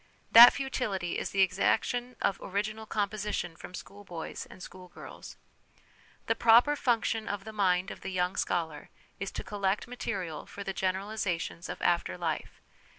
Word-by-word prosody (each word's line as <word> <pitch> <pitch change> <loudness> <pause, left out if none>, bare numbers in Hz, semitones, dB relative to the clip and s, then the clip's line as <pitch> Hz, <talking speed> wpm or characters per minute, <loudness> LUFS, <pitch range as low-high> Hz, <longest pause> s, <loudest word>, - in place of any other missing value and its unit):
That 235 +2 +12
futility 230 -10 -2
is - - -3
the 195 -1 +4
exac 190 +4 +2
tion 245 0 -3
of 195 - +1
original 215 +3 -3
composition 205 -5 -2
from 180 - -10
schoolboys 190 -5 -8
and 185 - -12
schoolgirls. 180 -1 -11 0.9
The - - +2
proper 235 +6 +5
function 230 -4 0
of 205 -1 -3
the 220 +1 -8
mind 185 -2 +1
of - - -9
the - - -5
young 180 0 0
scholar 160 -6 -2 0.3
is 200 - -3
to - - -5
collect 200 -1 -1
material 190 -9 -4
for 200 - -8
the 195 - -3
general 190 +2 -1
isations 180 -4 -3
of - - -5
after 175 0 +1
life. 165 -3 -4
195 Hz, 155 wpm, -30 LUFS, 180-220 Hz, 0.9 s, That